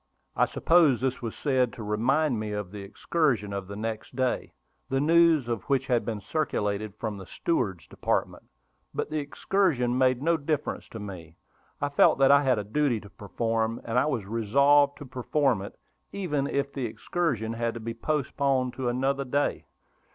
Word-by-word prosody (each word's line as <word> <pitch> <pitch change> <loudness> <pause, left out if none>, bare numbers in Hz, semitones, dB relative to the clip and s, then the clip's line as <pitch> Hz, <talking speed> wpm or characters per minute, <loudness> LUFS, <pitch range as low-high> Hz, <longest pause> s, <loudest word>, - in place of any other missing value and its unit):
I - - +3
supposed 165 -7 +4
this 130 -1 -1
was 115 -2 -5
said 130 -5 +1
to 115 - -8
remind 120 +5 +1
me 105 -1 -3
of 105 -3 -4
the 105 -1 -7
excursion 105 - -1
of 100 -1 -4
the 100 - -7
next 110 +3 -5
day, 130 -1 -1 0.4
the 135 - +1
news 165 -2 +4
of 115 -4 -2
which 135 -2 +2
had 120 -2 +1
been 110 -3 -3
circulated 105 -6 -2
from 110 -2 -4
the 95 - -10
steward's 95 - -1
department. - - -2 0.5
But - - -2
the 155 - 0
excursion 145 -4 0
made 130 -1 +3
no 165 +4 +2
difference 150 0 -3
to 110 - -8
me; 90 -6 -8 0.4
I 145 - -1
felt 145 - +4
that 135 0 +5
I 140 0 +7
had 130 -4 +2
a 105 - -2
duty 120 +2 0
to 105 -1 -14
perform, 115 +2 -2
and 115 +2 +1
I 140 - +2
was 125 -9 -1
resolved 140 +7 +3
to 145 - -9
perform 130 -2 0
it, 100 - -9 0.3
even 150 -8 -1
if 140 0 -1
the 135 -3 -2
excursion 115 - -2
had 115 0 -2
to - - -5
be 115 +1 -5
postponed 135 -1 0
to 130 -2 -1
another 135 +3 0
day. 140 +2 -1
125 Hz, 180 wpm, -27 LUFS, 110-145 Hz, 0.5 s, I